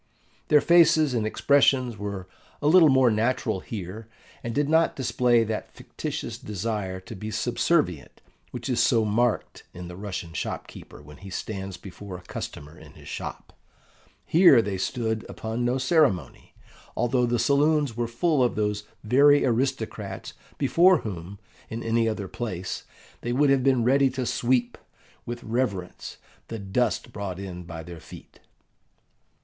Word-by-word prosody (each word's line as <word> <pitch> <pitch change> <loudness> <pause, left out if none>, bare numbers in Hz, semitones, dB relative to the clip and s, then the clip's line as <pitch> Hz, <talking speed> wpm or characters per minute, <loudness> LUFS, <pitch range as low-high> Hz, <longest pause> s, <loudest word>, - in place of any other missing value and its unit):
Their 150 -1 +5
faces 165 -4 +5
and 110 -3 0
expressions 130 -1 +3
were 100 -2 -5 0.3
a - - -6
little 160 +1 +7
more 130 -3 +5
natural 110 -1 0
here, 105 +2 -7 0.4
and 115 - -3
did 145 0 +1
not 160 +2 +3
display 120 -2 +2
that 110 -1 -5
fictitious - - -6
desire 105 -2 -3
to 110 - -9
be 105 +3 -6
subservient 120 - 0 0.3
which - - -6
is - - 0
so 115 -1 +3
marked 115 +2 0
in 90 0 -8
the 90 - -8
Russian 95 -4 -6
shop - - -4
keeper - - -13
when 75 0 -13
he 100 - -11
stands 95 -1 -5
before 95 -1 -9
a 90 - -15
customer 75 -3 -7
in - - -14
his - - -15
shop. - - -7 0.7
Here 165 -7 +6
they 100 -4 -1
stood 110 +1 -2
upon 110 +2 -4
no 120 +2 +1
ceremony, 135 - +1 0.4
although 120 0 +2
the 120 0 +1
saloons 145 -1 +2
were 120 0 -1
full 140 +5 +1
of 120 - +1
those 105 -1 -1 0.2
very 140 +6 +5
aristocrats 115 -6 -2 0.2
before 170 +5 +4
whom, 95 -1 -7 0.3
in 115 +1 -5
any 115 0 +1
other 105 -3 -4
place, 95 -5 -5 0.4
they 120 - -2
would 140 +2 +3
have 135 -2 +3
been 130 -3 +3
ready 135 +3 +4
to 130 -1 -3
sweep, 120 +1 0 0.5
with 120 0 -5
reverence, 110 -6 -3 0.3
the 115 - -5
dust 110 +4 -1
brought 100 -3 -5
in 95 -2 -7
by 80 -1 -7
their 85 0 -9
feet. - - -14
115 Hz, 155 wpm, -26 LUFS, 100-130 Hz, 0.7 s, little